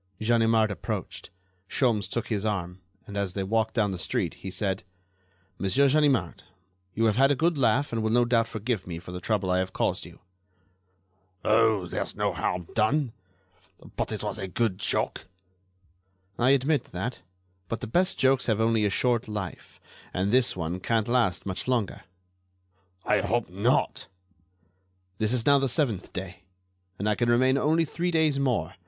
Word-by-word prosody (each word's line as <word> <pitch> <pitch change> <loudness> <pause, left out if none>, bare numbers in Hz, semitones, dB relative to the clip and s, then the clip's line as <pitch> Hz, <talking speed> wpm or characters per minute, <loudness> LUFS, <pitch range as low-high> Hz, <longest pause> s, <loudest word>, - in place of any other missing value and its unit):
Ganimard 115 -1 +3
approached. 100 - -5 0.4
Sholmes 110 -7 +1
took 120 - -3
his 105 -3 -1
arm, 95 -4 -3 0.2
and 100 - -9
as 100 -3 -1
they 95 - -2
walked 110 +3 0
down 105 -4 +2
the 95 - -5
street - - -1
he 95 - -8
said: 95 +1 -1 0.8
"Monsieur 100 +9 +3
Ganimard, 135 - +2 0.5
you 115 - +2
have 110 -1 +2
had 135 +1 +5
a 145 - +3
good 165 +4 +1
laugh 135 +1 +1
and 115 - 0
will 110 - 0
no 120 +2 +3
doubt 115 -1 +2
forgive 110 -3 -3
me 85 -2 -5
for 90 +1 -9
the 90 0 -6
trouble 100 -2 0
I 90 - +2
have 95 0 -2
caused - - -1
you." - - -14 1.3
"Oh! 110 -3 +3
there's - - -4
no - - 0
harm 90 -1 -2
done; 120 +3 +1 0.8
but - - -2
it - - -3
was - - -3
a 95 - -3
good 95 0 -1
joke." - - -1 1.1
"I 125 +2 +4
admit 140 0 +2
that; 95 +8 -5 0.5
but 115 - -4
the - - -3
best 180 - +1
jokes 135 -1 +3
have 110 -2 +1
only 110 -1 +2
a - - +2
short 120 +3 +1
life, 105 -4 -6 0.4
and 95 +3 0
this 125 0 +3
one 85 +1 -3
can't 110 +2 0
last 120 -7 +1
much 95 +2 -4
longer." 120 -9 -1 1.0
"I - - +3
hope - - -1
not." - - 0 1.1
"This 110 0 +1
is 125 -2 0
now 140 -1 +6
the 135 -1 0
seventh 120 - 0
day, 95 0 -7 0.6
and 100 - -2
I 105 - +3
can 120 +2 0
remain 130 +3 +4
only 160 +4 +2
three 175 +3 -2
days 160 -4 +2
more. 115 - 0
110 Hz, 170 wpm, -27 LUFS, 95-125 Hz, 1.3 s, now